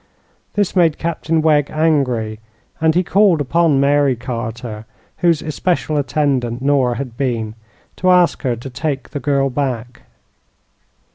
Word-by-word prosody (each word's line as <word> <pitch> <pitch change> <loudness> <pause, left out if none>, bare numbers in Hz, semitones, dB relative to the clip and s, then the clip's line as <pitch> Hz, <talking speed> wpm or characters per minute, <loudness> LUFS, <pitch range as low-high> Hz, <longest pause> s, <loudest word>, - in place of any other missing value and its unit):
This 205 -2 0
made 165 -4 +3
Captain 165 -1 -1
Wegg 150 -3 +3
angry, 130 -9 0 0.4
and 160 0 +3
he 180 - +3
called 190 -2 +3
upon 150 +1 +2
Mary 140 -1 +3
Carter, 115 -2 -6 0.3
whose 170 -4 +2
especial 155 0 -1
attendant 130 -4 0
Nora 135 -3 +2
had 125 -3 -6
been, 115 -5 -2 0.4
to 185 - +1
ask 180 -1 +4
her 125 -4 0
to 120 +4 -8
take 140 +1 -3
the 145 - -4
girl 140 -1 +1
back. 125 -3 -3
140 Hz, 135 wpm, -18 LUFS, 125-160 Hz, 0.4 s, ask